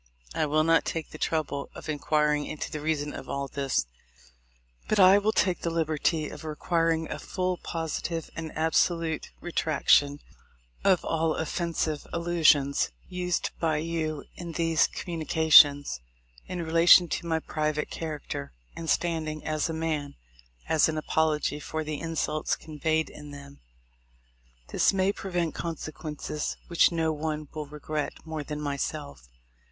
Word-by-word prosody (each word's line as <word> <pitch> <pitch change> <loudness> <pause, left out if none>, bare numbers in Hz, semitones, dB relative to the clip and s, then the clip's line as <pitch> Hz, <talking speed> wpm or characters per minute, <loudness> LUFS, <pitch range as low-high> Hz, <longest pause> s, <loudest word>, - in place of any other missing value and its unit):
I - - 0
will 155 +1 +3
not 165 +1 +4
take 165 -2 -4
the 155 - -9
trouble 150 -3 -1
of - - -9
inquiring 150 -1 +1
into 155 - -5
the 155 - -4
reason 150 -1 -1
of 135 - -8
all 140 0 -2
this, 135 - -1 1.0
but 215 - +1
I 190 +1 +8
will 210 +2 +1
take 185 -4 +1
the 170 - -1
liberty 160 -1 0
of - - -9
requiring 165 +1 0
a 150 - -4
full, 185 +1 -2
positive, 165 0 -4
and 160 -1 -5
absolute 160 0 +1
re 175 - -6
traction 145 -3 +3 0.7
of 190 -3 +3
all 165 -1 +1
offensive 160 -2 -2
allusions 160 -5 +3 0.2
used 180 -1 -1
by 160 -2 +1
you 155 -2 -2
in 170 -1 -7
these 165 -1 +3
communications, 155 - +4 0.5
in 175 -2 -4
relation 165 +2 +7
to 170 - -3
my 160 -1 +1
private 155 -1 -2
character 150 - -5 0.2
and 165 -1 -5
standing 160 -3 -1
as 155 +1 0
a - - -1
man, 160 -3 -2 0.5
as 160 0 +4
an 155 - -2
apology 155 -1 0
for 155 +2 -4
the 155 -1 -4
insults 160 -2 -1
con 155 -2 -11
veyed 160 +1 +1
in 150 0 -11
them. 140 -1 -11 1.1
This - - +3
may 190 0 +2
prevent 175 -5 -2
consequences 155 -2 -4
which 170 0 +5
no 160 -1 +1
one 155 -1 -3
will 150 -2 -5
regret 150 +1 -4
more 160 -2 -4
than 150 +1 -5
myself. 100 - -4
160 Hz, 145 wpm, -28 LUFS, 150-165 Hz, 1.1 s, I